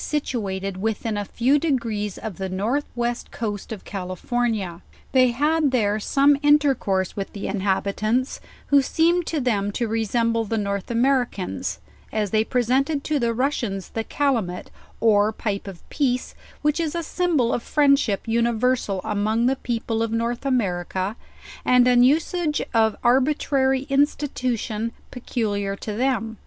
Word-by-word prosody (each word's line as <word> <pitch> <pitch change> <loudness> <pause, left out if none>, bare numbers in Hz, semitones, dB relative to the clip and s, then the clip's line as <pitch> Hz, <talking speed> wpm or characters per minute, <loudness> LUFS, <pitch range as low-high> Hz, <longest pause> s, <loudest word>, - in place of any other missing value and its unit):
175 300 -1 -1
situated 195 -5 -3
within 220 +2 -2
a 205 - -1
few 255 +8 +2
degrees 230 - -1
of 205 -5 -7
the 190 -1 -3
north 220 +10 -1
west 240 0 -2
coast 205 -3 -5
of 215 -4 -7
Cal 190 -3 -5
ifornia. 200 -2 -2 0.3
They 255 -1 +5
had 295 +5 +2
there 215 -5 +1
some 280 +6 +3
intercourse 275 - +2
with 195 -1 -5
the 200 - -6
inhabi 195 0 0
tants, 240 +5 0 0.3
who 285 -1 +6
seemed 335 +5 +2
to 320 - -1
them 205 -6 0
to 235 +1 -1
resemble 230 +1 0
the 225 +1 -2
North 200 -2 -2
Americans; 245 -5 0 0.3
as 210 -3 -1
they 215 0 +3
presented 265 +5 +1
to 305 -2 0
the 235 -2 +1
Russians 230 -6 -2
the 225 - -3
calumet 225 -10 -1 0.3
or 215 -1 +4
pipe 205 -2 -3
of 190 -3 -10
peace;, 255 -3 0 0.3
which 300 +2 +2
is 325 -1 -1
a 340 - -1
symbol 315 -8 +1
of - - -1
friendship 275 -8 +2
universal 235 -3 +1
among 215 +3 0
the 260 +2 +3
people 230 -3 -2
of 230 -1 -1
North 235 +3 -1
America 190 -4 -1 0.5
and 250 0 +5
an 245 -1 +5
usage 305 +4 +2
of 220 -2 +3
arbitrary 265 +1 +2
institution 255 -6 -1 0.2
pecu 245 -3 -2
liar 200 -1 -2
to 210 +1 -6
them." 225 -2 -1
235 Hz, 150 wpm, -23 LUFS, 205-270 Hz, 0.5 s, who